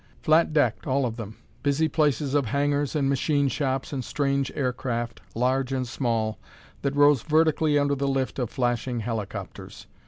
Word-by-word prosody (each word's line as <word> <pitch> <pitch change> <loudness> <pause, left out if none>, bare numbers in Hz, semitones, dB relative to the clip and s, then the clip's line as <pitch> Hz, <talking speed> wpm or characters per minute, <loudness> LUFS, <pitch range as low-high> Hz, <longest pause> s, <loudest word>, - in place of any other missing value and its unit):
Flat 160 +1 +4
decked, 135 -8 +1
all 135 0 +1
of 115 -2 -3
them; 110 -2 -8 0.2
busy 145 +3 +2
places 150 -3 +1
of 140 -4 +2
hangars 145 +3 0
and 140 -3 +1
machine 140 +1 +1
shops 135 -1 -2
and 130 -2 -2
strange 140 0 -1
aircraft, 120 -5 -2
large 130 +2 +1
and 130 -2 -1
small, 115 -3 -1 0.4
that 140 0 -1
rose 145 -3 +5
vertically 155 0 +2
under 145 0 +2
the 140 0 -1
lift 135 0 -1
of 125 -3 -1
flashing 120 -1 -1
helicopters. 110 -3 -6
135 Hz, 160 wpm, -26 LUFS, 120-145 Hz, 0.4 s, rose